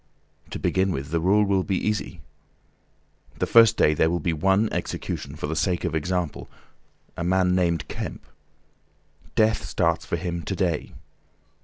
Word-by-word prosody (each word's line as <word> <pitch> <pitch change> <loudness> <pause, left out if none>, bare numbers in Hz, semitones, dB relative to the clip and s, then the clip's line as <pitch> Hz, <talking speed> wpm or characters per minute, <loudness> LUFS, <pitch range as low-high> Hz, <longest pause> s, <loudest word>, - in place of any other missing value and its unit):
To - - -5
begin 95 0 +1
with 70 -3 -4
the 85 - +1
rule 100 +5 +3
will 100 -2 +2
be 95 0 -1
easy. 105 -6 -2 1.2
The - - 0
first 115 -1 +6
day 75 - +4
there 80 +1 +2
will 85 +1 0
be 85 +1 -1
one 95 +7 +2
execution 70 +2 -4
for 80 - -5
the 80 +2 -3
sake 90 +2 0
of 85 -3 -2
example—a 85 0 -5
man 90 +1 +2
named 85 -3 +1
Kemp. - - -6 1.1
Death 110 0 +2
starts - - 0
for - - -2
him 85 -2 -3
to 95 - -4
day. 90 -5 -1
90 Hz, 155 wpm, -24 LUFS, 80-95 Hz, 1.2 s, first